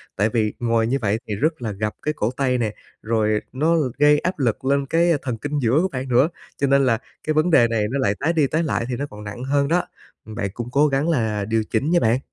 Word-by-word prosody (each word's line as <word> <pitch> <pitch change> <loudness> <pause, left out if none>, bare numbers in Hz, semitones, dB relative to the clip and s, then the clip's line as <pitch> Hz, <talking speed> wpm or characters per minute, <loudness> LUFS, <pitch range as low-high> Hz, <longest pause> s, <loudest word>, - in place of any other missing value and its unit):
tại 105 +3 +1
vì 110 -3 0
ngồi 115 -1 +1
như 130 +4 +1
vậy 105 -1 +1
thì 105 - -2
rất 155 +6 -1
là 110 -3 -3
gập 105 +2 -3
cái 150 - -1
cổ 115 -5 -1
tay 130 -2 +1
nè, 110 -3 -1 0.3
rồi 110 -1 +1
nó 155 +6 +1 0.2
gây 150 +1 +5
áp 180 0 -3
lực 125 -1 -1
lên 140 +1 +2
cái 170 +4 +2
thần 125 -4 -3
kinh 145 +5 -3
giữa 125 +3 +2
của 190 - +1
bạn 130 -1 -4
nữa. 125 +6 +4 0.3
Cho 140 - +1
nên 140 0 +4
là 115 -3 +3 0.3
cái 155 - +2
vấn 155 +3 +2
đề 120 -7 +6
này 115 -2 0
nó 140 - -1
lại 105 -6 +1
tái 165 +3 +1
đi 155 -4 +2
tái 160 +5 0
lại 135 -6 -1
thì 125 - -1
nó 140 - -3
còn 105 0 -10
nặng 105 +4 -7
hơn 140 +1 +1
đó. 175 +4 +2 0.4
Bạn 110 -2 -4
cũng 120 +1 -5
cố 145 +4 +4
gắng 140 +3 0
là 110 -9 0
điều 110 +1 0
chỉnh 125 +7 0
nha 175 - +4
bạn! 115 0 +2
130 Hz, 265 wpm, -22 LUFS, 110-145 Hz, 0.4 s, đề